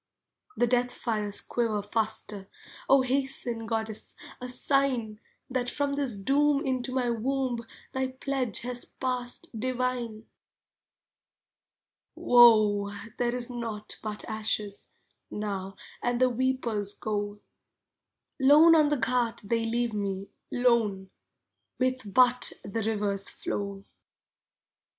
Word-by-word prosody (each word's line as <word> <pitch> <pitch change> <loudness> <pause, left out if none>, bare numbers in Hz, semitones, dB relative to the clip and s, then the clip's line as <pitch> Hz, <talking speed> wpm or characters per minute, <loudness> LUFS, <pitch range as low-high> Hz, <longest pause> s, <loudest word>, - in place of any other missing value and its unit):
The 240 - +4
death 245 +1 +1
fires 210 -3 0
quiver 220 -4 -1
faster, 210 -2 -2 0.4
O 270 -1 +6
hasten, 255 -3 -1
goddess, 220 -1 -3 0.3
a 250 - -5
sign, 250 -4 0 0.3
That 250 -1 -1
from 285 -1 -1
this 280 -5 -1
doom 280 +7 +2
into 255 -1 -1
my 250 -2 +1
womb 255 +1 -1 0.3
Thy 265 0 0
pledge 260 -3 -2
has 245 0 -3
passed, 255 +5 -3
divine. 250 -3 -2 1.9
Woe! 215 -4 +6 0.3
there 240 0 +1
is 250 0 -1
naught 225 -3 -5
but 210 -1 -5
ashes, 215 -2 -2 0.4
Now, 195 -2 -4 0.3
and 245 0 0
the 255 0 +4
weepers 235 -5 0
go. 205 -1 -3 1.0
Lone 295 +5 +7
on 305 -2 +5
the 295 - +1
ghat 240 -1 0
they 230 +3 0
leave 235 0 0
me, 200 -1 -3 0.2
lone, 220 -6 +2 0.7
With 255 -4 -1
but 250 +2 +4
the 225 +3 -3
River's 205 -2 -1
flow. 200 -1 -4
240 Hz, 110 wpm, -28 LUFS, 210-255 Hz, 1.9 s, Lone